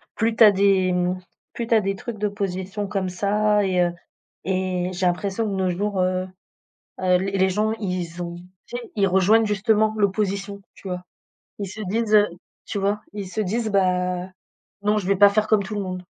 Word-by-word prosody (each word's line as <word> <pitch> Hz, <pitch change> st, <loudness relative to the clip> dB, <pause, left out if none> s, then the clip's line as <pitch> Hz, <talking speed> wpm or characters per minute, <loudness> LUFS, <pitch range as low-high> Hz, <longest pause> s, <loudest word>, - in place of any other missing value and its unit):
plus 225 Hz, 0 st, +1 dB
tu 225 Hz, -, +6 dB
as 210 Hz, -, +9 dB
des, 190 Hz, -1 st, +3 dB
mmh, 180 Hz, +1 st, 0 dB, 0.3 s
plus 235 Hz, -1 st, -4 dB
tu 235 Hz, -, +1 dB
as 220 Hz, -, +5 dB
des 195 Hz, 0 st, -1 dB
trucs 230 Hz, +2 st, -7 dB
d'opposition 200 Hz, -1 st, -3 dB
comme 195 Hz, -2 st, -2 dB
ça 210 Hz, +3 st, +1 dB
et 185 Hz, -2 st, +2 dB
heu 175 Hz, -1 st, +2 dB, 0.5 s
et 185 Hz, -1 st, -1 dB
j'ai 180 Hz, +1 st, -1 dB
l'impression 195 Hz, +5 st, 0 dB
de 200 Hz, -, -2 dB
nos 190 Hz, -1 st, 0 dB
jours, 200 Hz, +2 st, -1 dB
heu 185 Hz, 0 st, 0 dB, 0.8 s
heu, 180 Hz, -1 st, +4 dB
les 195 Hz, +1 st, -2 dB
les 190 Hz, 0 st, +3 dB
gens 215 Hz, +3 st, 0 dB
ils 180 Hz, -5 st, -4 dB
ont 170 Hz, 0 st, -6 dB, 0.3 s
tu 240 Hz, -, -5 dB
sais, 240 Hz, -1 st, -9 dB
ils 200 Hz, -2 st, +3 dB
rejoignent 195 Hz, +5 st, +4 dB
justement 215 Hz, +1 st, +2 dB
l'opposition, 200 Hz, 0 st, -1 dB
tu -, -, -11 dB
vois? 180 Hz, -1 st, -4 dB, 0.6 s
Ils 200 Hz, -, -3 dB
se 215 Hz, -, -7 dB
disent, 215 Hz, +2 st, +1 dB
heu 210 Hz, 0 st, +6 dB, 0.4 s
tu 205 Hz, -, -3 dB
vois 205 Hz, +2 st, 0 dB
ils 200 Hz, -2 st, -5 dB
se 215 Hz, +4 st, -2 dB
disent: 220 Hz, +3 st, -1 dB
«Bah, 180 Hz, -1 st, +1 dB, 0.5 s
non 210 Hz, +1 st, +2 dB
je 190 Hz, -3 st, -2 dB
vais 200 Hz, -, +3 dB
pas 200 Hz, +1 st, +7 dB
faire 215 Hz, +1 st, +1 dB
comme 210 Hz, -2 st, +3 dB
tout 210 Hz, +3 st, -6 dB
le 205 Hz, -, -1 dB
monde.» 185 Hz, -1 st, -5 dB
195 Hz, 205 wpm, -23 LUFS, 185-210 Hz, 0.8 s, as